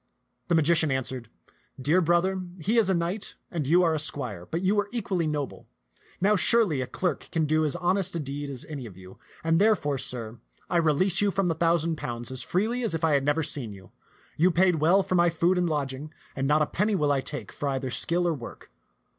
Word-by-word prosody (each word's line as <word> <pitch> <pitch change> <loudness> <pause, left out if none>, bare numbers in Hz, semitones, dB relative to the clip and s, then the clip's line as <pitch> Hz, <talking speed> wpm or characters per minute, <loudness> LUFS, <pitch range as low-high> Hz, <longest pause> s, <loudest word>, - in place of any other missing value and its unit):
The 175 - +2
magician 160 0 +3
answered, 130 -3 -3 0.3
" - - -27
Dear 180 +4 +5
brother, 175 +3 +1 0.2
he 215 +8 +2
is 210 -4 +2
a 190 - +3
knight 175 +5 -3 0.2
and 160 -6 -3
you 175 +4 +5
are 165 -2 +3
a 155 - -1
squire, 105 - -3
but 165 +3 -3
you 190 +2 +3
were 205 -1 0
equally 195 -8 -1
noble. 145 -2 -4 0.5
Now 205 +3 +3
surely 200 - +3
a 125 - -3
clerk 180 -2 -3
can 160 -2 +1
do 155 +1 +2
as 150 - 0
honest 180 +1 0
a - - -1
deed 145 0 -5
as 130 -3 -6
any 140 -6 -7
of 95 -4 -13
you; 95 0 -14 0.2
and, 165 +2 +2
therefore, 170 -11 +2
sir, 120 -4 -5 0.3
I 175 - +3
release 170 +4 +3
you 205 - +3
from 195 -1 0
the - - +2
thousand 165 0 +1
pounds 120 -2 -5
as 130 0 -3
freely 220 - -1
as 225 -9 -1
if 165 - -4
I 160 - +3
had 140 -1 +2
never 145 +3 +1
seen 125 -8 -1
you. 95 -2 -14 0.5
You 175 +4 +4
paid 180 0 +3
well 170 +6 +4
for - - -3
my 175 -1 +4
food 170 +2 +1
and 180 -1 +1
lodging, 145 0 -3 0.2
and 135 -1 -1
not 150 +1 +3
a - - +1
penny 205 +7 0
will 150 -5 +1
I 140 -1 +1
take 145 +2 -6
for 145 - -3
either 135 -1 -2
skill 170 +8 +1
or 170 - +1
work. 125 -6 -10
160 Hz, 230 wpm, -26 LUFS, 140-180 Hz, 0.5 s, Dear